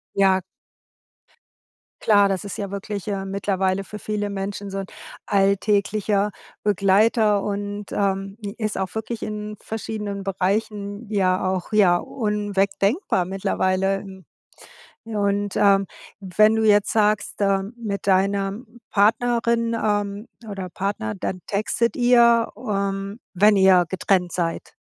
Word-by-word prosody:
Ja. 190 -1 +4 1.6
Klar, 205 -2 +4
das 190 -1 -2
ist 200 - -6
ja 200 -2 -4
wirklich, 200 0 -5
äh, 195 -2 -2
mittlerweile 195 -1 -1
für 210 - -8
viele 210 0 -3
Menschen 200 0 -5
so 195 - -4
'n 195 - -4 0.4
alltäglicher 200 +1 +1 0.3
Begleiter 205 +1 +3
und, 205 0 -4
ähm, 195 0 -1 0.2
ist 215 -2 -2
auch 190 -1 -3
wirklich 220 +1 -4
in 210 0 -5
verschiedenen 210 -2 -5
Bereichen 200 +2 -2
ja 185 -3 +1
auch, 185 +1 -4
ja, 195 -5 +5
unwegdenkbar 205 - 0
mittlerweile. 190 +1 0 1.0
Ja, 220 -2 -4
und, 200 0 0
ähm, 195 -1 +4 0.3
wenn 210 +3 +3
du 220 0 +1
jetzt 205 -1 +4
sagst, 210 -1 +1
äh, 195 -1 +2 0.2
mit 200 -4 -5
deiner 195 +1 +2 0.4
Partnerin, 230 +2 +2
ähm, 205 -1 -1 0.2
oder 195 -2 -5
Partner, 180 - -3
dann 185 - -4
textet 215 +6 0
ihr, 235 -2 +5
ähm, 200 -1 -3
wenn 205 +3 +5
ihr 190 -2 +6
getrennt 180 -1 0
seid? 170 -2 -3
200 Hz, 120 wpm, -23 LUFS, 195-210 Hz, 1.6 s, ihr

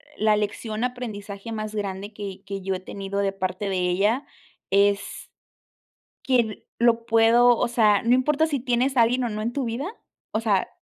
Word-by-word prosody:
la 215 -1 +3
lección 215 +2 -2
aprendizaje 215 -4 -6
más 215 -1 -4
grande 200 0 -4
que 200 -2 -7
que 195 0 -5
yo 190 0 -2
he 185 - -4
tenido 195 +1 -5
de 195 -1 0
parte 185 +1 -3
de 190 - -1
ella, 195 +8 +1 0.5
es 200 0 +1 0.9
que 235 -5 0
lo 235 -1 +3
puedo 235 +2 +5
o - - +1
sea, 215 -4 +3
no 235 +2 +4
importa 300 +5 +2
si 285 -3 -1
tienes 250 +2 0
a 235 - +7
alguien 245 +3 +2
o 240 - 0
no 215 0 -4
en 235 - -2
tu 275 +1 -2
vida, 235 +6 -3 0.5
o 215 - 0
sea, 205 -4 +1
215 Hz, 185 wpm, -24 LUFS, 200-240 Hz, 0.9 s, a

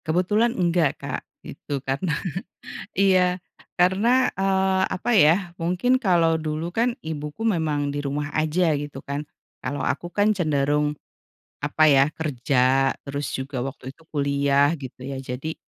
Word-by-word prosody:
Kebetulan 205 +8 +1
enggak 170 -5 +2
Kak - - -5 0.2
gitu 145 - -5
karena 145 +5 -1 0.8
iya, 185 -2 +3 0.4
karena, 210 +9 +4
eee, 190 -1 +2
apa 235 +6 -2
ya 160 -4 +7 0.2
mungkin 180 +9 +1
kalau 170 -7 +3
dulu 155 +2 -3
kan 235 +5 +1
ibuku 150 +5 -5
memang 155 -7 0
di 145 - -3
rumah 145 +1 -2
aja 155 +1 +2
gitu 145 -1 -5
kan, 140 +1 -4 0.4
kalau 145 +3 -3
aku 175 - -2
kan 210 +2 +2
cenderung 150 -3 +1 0.7
apa 150 +2 +2
ya, 135 0 +5
kerja, 135 -2 +1
terus 140 0 -3
juga 130 0 -4
waktu 130 0 -6
itu 165 - -22
kuliah 140 0 +2
gitu 130 -2 -9
ya 135 0 -5
jadi 135 +5 -5
155 Hz, 140 wpm, -24 LUFS, 140-180 Hz, 0.8 s, ya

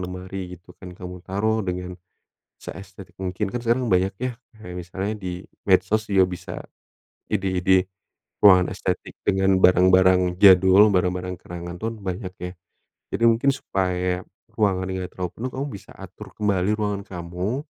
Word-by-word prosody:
lemari 90 0 -6
gitu 90 +1 -20
kan 90 -1 -10
kamu 90 0 -8
taruh 110 +4 0
dengan, 90 0 -4 0.7
seestetik 95 -2 -10
mungkin, 95 +2 -2
kan 120 - -2
sekarang 120 +2 +1
banyak 95 0 +2
ya 125 0 -2 0.3
kayak 90 -4 -9
misalnya 95 +4 -4
di 90 -2 -6 0.2
medsos 110 0 +2
juga 95 -1 +5
bisa 90 0 -7 0.8
ide-ide 95 -2 +2 0.6
ruangan 90 -2 +6
estetik 90 -2 -3
dengan 95 -1 +3
barang-barang 90 0 +5
jadul, 95 +2 +7
barang-barang 90 0 0
kenangan 85 0 -7
pun 115 0 -3
banyak 95 0 -4
ya. 90 0 -4 0.6
Jadi 115 +4 +1
mungkin 115 +4 +2
supaya 90 -5 -1 0.3
ruangannya 95 -3 0
enggak 90 - -5
terlalu 90 -1 -3
penuh, 125 +3 -4
kamu 135 +2 -3
bisa 100 - -11
atur - - -11
kembali 100 -1 +1
ruangan 105 -2 -2
kamu 90 - -4
95 Hz, 140 wpm, -23 LUFS, 90-100 Hz, 0.8 s, jadul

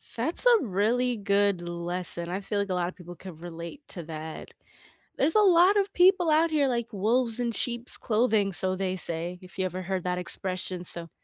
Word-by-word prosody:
That's 260 - -1
a 485 -2 +7
really 230 +5 0
good 200 -2 +1
lesson. 175 0 -3
I 185 +2 -3
feel 205 +1 -3
like 200 0 -2
a 185 - 0
lotta 180 0 -1
people 175 -1 -11
could 170 -2 -11
relate 170 - -8
to 175 - -5
that. 160 0 -8 0.6
There's 300 +4 +1
a 430 - +5
lot 375 0 +5
of 400 0 +1
people 355 -2 +4
out 320 +2 +3
here 295 -3 +2
like 235 -2 -2
wolves 230 +4 +1
in 235 -1 -1
sheep's 240 +2 0
clothing, 215 -3 +1
so 185 +1 0
they 185 -1 -2
say, 170 0 -3
if 185 +1 -14
you 190 - 0
ever 185 0 -4
heard 185 0 -3
that 180 0 -1
expression, 180 0 -1
so 170 -1 -2
195 Hz, 200 wpm, -27 LUFS, 180-245 Hz, 0.6 s, a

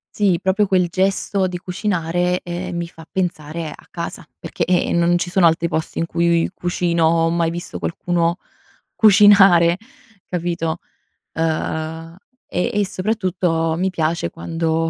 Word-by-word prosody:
Sì 195 -5 +2
proprio 190 +2 +2
quel 185 -2 +2
gesto 190 +2 0
di 180 -1 -4
cucinare, 180 -1 -1
ehm, 175 +1 -5
mi 170 0 -3
fa 165 -1 -14
pensare 165 -3 -3
a - - -13
casa 170 0 -6
perché, - - -3
ehm, 175 -1 +1
non 170 +1 +3
ci 175 - -3
sono 180 0 +3
altri 165 +1 +3
posti 160 -1 -3
in 165 - 0
cui 170 0 +1
io - - -2
cucino 175 -2 0
o 165 0 +3
ho - - +2
mai 170 0 +1
visto 175 +1 -6
qualcuno 170 0 -1 0.6
cucinare 195 -5 +6 0.5
capito? 170 -2 -2 0.6
Uhm, 160 0 -3 0.3
e 180 +7 -1
e 205 -1 +1
soprattutto 185 -5 -1
mi 185 +2 0
piace 165 -1 -1
quando 165 0 -2
175 Hz, 150 wpm, -20 LUFS, 165-185 Hz, 0.6 s, cucinare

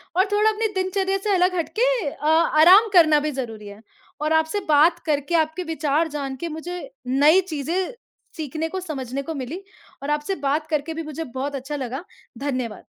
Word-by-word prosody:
और 375 - +4
थोड़ा 425 +1 +4
अपनी 440 +1 0
दिनचर्या 380 +1 0
से 415 - +1
अलग 365 0 +2
हट 335 - -1
के - - +5 0.2
अ, 295 - -9
आराम 335 +6 +6
करना 315 -4 +6
भी 300 +1 -2
ज़रूरी 225 -6 -6
है। 205 +2 -11 0.4
और 305 +1 +1
आपसे 320 +5 +1
बात 320 +4 +5
करके, 295 +1 0
आपके 315 +2 +1
विचार 320 -1 0
जान 280 -2 -4
के 340 +6 -5
मुझे 350 +7 -6 0.2
नई 290 +8 +5
चीजें 330 - -2 0.5
सीखने 315 +1 -3
को, 375 - -4
समझने 275 -6 -4
को 325 - -5
मिलीं 280 +6 -5 0.4
और 290 - -4
आपसे 295 +6 -1
बात 290 +3 0
करके 315 0 -2
भी 325 0 -5
मुझे 310 +1 -5
बहुत 275 +1 -4
अच्छा 275 +2 -5
लगा 265 +1 -4 0.3
धन्यवाद। 255 -6 -3
310 Hz, 185 wpm, -23 LUFS, 280-350 Hz, 0.5 s, आराम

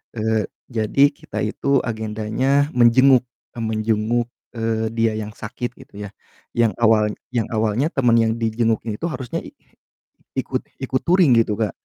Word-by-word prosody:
eee, 110 -1 0 0.2
jadi 120 +4 +3
kita 105 - -7
itu 110 +6 -3 0.2
agendanya 110 +6 0
menjenguk, 125 +2 +6 0.3
eee, 115 - -4
menjenguk, 110 +2 0 0.3
eee, 110 -1 -1
dia 115 -1 +1
yang 110 0 -4
sakit 120 +2 -6
gitu - - -16
ya. 100 - -6 0.4
Yang 115 -2 +2
awal 110 -1 +5 0.3
yang 115 -3 0
awalnya 110 +5 0
temen 120 -4 +4
yang 110 0 +2
dijenguknya 115 -1 -1
itu 170 - -2
harusnya 130 -7 -4
i - - -12 0.8
ikut - - -2 0.2
ikut 130 - -1
touring 175 -6 +5
gitu, 110 -2 +1
Kak. 110 - 0
115 Hz, 145 wpm, -21 LUFS, 110-120 Hz, 0.8 s, menjenguk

